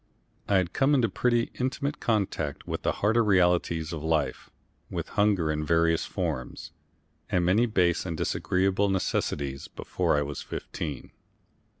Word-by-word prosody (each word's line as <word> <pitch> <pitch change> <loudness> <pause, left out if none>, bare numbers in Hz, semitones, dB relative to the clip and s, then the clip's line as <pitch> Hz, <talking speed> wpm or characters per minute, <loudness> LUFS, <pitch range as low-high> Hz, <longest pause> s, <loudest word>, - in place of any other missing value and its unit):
I 100 - +3
had 95 -2 +1
come 140 +2 +3
into 120 -4 +2
pretty 120 -1 +1
intimate 135 +3 -2
contact 95 -10 -1
with - - -3
the - - +1
harder 115 +2 +4
realities 90 -4 +2
of 80 - -4
life, 75 -4 -1 0.4
with - - -4
hunger 100 -6 +2
in 75 0 -2
various 85 +1 +2
forms, 65 -1 -4 0.6
and 90 -4 +1
many 105 +7 +3
base 90 -6 +2
and 85 -3 -4
disagreeable 95 +4 +1
necessities, 70 -7 -1
before - - -1
I 75 - +2
was 70 -1 -5
fifteen. 75 -3 -6
90 Hz, 140 wpm, -27 LUFS, 80-105 Hz, 0.6 s, harder